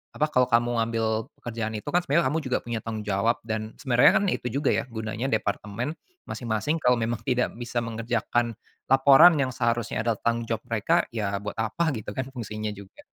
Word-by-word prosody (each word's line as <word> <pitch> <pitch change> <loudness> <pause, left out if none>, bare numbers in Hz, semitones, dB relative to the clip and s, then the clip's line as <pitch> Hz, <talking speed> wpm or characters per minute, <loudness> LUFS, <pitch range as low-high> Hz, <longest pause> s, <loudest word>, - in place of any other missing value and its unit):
apa, 150 0 0
kalau 125 -2 +3
kamu 120 0 +2
ambil 115 -1 0
pekerjaan 115 -2 -4
itu 105 - -5
kan 175 - +4
sebenarnya 165 -4 +1
kamu 160 - 0
juga 130 -5 -1
punya 120 -1 -3
tanggung 110 -1 -5
jawab 105 +3 +1
dan 110 0 -4
sebenarnya 125 -4 +4
kan - - +3
itu - - -2
juga 140 +4 0
ya - - 0
gunanya 110 +1 -4
departemen, 110 +2 -2 0.3
masing-masing 120 +7 -2
kalau 125 -4 +3
memang 115 -1 -2
tidak 125 0 +1
bisa 120 0 -2
mengerjakan, 115 0 -1 0.3
laporan 140 +6 +7
yang 135 -3 0
seharusnya 115 -2 -1
adalah 115 - +2
tanggung 115 0 0
jawab 115 -1 -2
mereka 110 -3 +2
ya 105 -4 -2
buat 105 +1 -5
apa 155 +9 0
gitu 110 -5 -6
kan 130 0 -4
fungsinya 110 -4 -5
juga. 100 -1 -13
115 Hz, 185 wpm, -26 LUFS, 110-130 Hz, 0.3 s, laporan